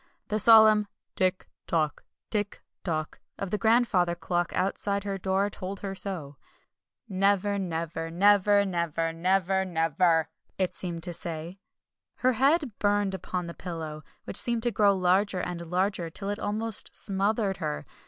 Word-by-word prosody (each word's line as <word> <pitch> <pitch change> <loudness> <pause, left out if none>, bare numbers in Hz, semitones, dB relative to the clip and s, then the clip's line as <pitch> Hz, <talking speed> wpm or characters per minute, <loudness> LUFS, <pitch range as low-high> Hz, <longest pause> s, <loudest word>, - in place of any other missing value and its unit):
The 215 0 0
solemn 215 -1 +7 0.3
"Tick 185 -1 0 0.2
tock! 155 -3 0 0.3
Tick 205 -2 -2 0.2
tock!" 155 -3 -3 0.2
of 195 -2 -5
the 210 - -1
grandfather 220 -7 +3
clock 175 +1 -1
outside 200 +1 0
her 200 -1 -3
door 190 +2 +1
told 190 +1 -6
her 195 -1 -4
so. 175 -8 -3 0.7
"Never 200 0 +1
never! 165 -2 -3
Never 200 +3 +4
never! 170 -3 -1
NEVER 190 +2 +1
NEVER!" 165 -1 +2 0.3
it 185 -2 0
seemed 170 -3 -3
to 175 - -3
say. 170 +2 -3 0.6
Her 255 0 +2
head 280 +3 +3
burned 205 -1 +1
upon 180 -1 -4
the 170 - -7
pillow, 160 -4 -6 0.2
which - - -2
seemed 235 -2 +1
to 240 - +1
grow 200 -1 +3
larger 185 +1 +2
and 170 -1 -5
larger, 180 0 -1
till 195 +4 -5
it 205 - -4
almost 215 +1 -2
smothered 200 0 0
her. 75 0 -4
190 Hz, 145 wpm, -27 LUFS, 170-205 Hz, 0.7 s, solemn